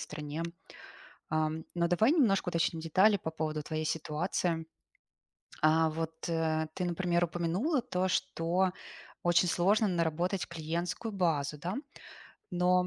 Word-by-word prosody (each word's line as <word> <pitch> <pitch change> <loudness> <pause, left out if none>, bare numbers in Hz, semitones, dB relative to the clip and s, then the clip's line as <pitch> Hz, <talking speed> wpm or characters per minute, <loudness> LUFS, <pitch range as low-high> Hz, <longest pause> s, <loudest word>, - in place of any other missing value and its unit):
стране. 150 +1 -5 0.9
Ам, 155 0 0
но 170 0 +2
давай 215 - +4
немножко 215 - +3
уточним 165 -1 0
детали 190 +6 +4
по 160 -3 -5
поводу 155 -1 -3
твоей 155 +1 -3
ситуации. 160 +1 -1 1.0
А, 160 +1 +4
вот, 160 +1 -4
э, 160 -1 0
ты, 180 - -1
например, 175 0 +1
упомянула 175 - 0
то, 185 -2 -1
что 180 +1 +1 0.5
очень 175 +1 +4
сложно 205 +6 +3
наработать 175 +2 0
клиентскую 170 +6 -3
базу, 155 -6 0
да? 175 +6 -3 0.8
Но, 180 0 +3
170 Hz, 120 wpm, -31 LUFS, 160-180 Hz, 1.0 s, давай